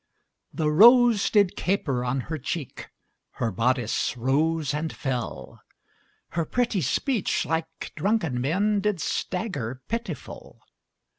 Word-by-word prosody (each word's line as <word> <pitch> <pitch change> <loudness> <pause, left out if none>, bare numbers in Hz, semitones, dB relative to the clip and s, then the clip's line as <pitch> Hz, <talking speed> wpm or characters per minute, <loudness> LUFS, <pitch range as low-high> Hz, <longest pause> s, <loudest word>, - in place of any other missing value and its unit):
The 155 -2 0
rose 235 +4 +6
did 200 -4 +3
caper 145 -10 -1
on 125 +2 -1
her 155 +5 -5
cheek, 145 +1 -5 0.4
Her 115 - -2
bodice 120 +3 0
rose 150 +5 +1
and 155 +2 -2
fell, 125 -5 -5 0.7
Her 170 - -1
pretty 235 +2 0
speech, 250 - 0
like 160 0 -4
drunken 165 - 0
men, 200 +10 +1
Did 210 -3 0
stagger 145 - -3
pitiful. 230 - -6
160 Hz, 115 wpm, -25 LUFS, 130-205 Hz, 0.7 s, rose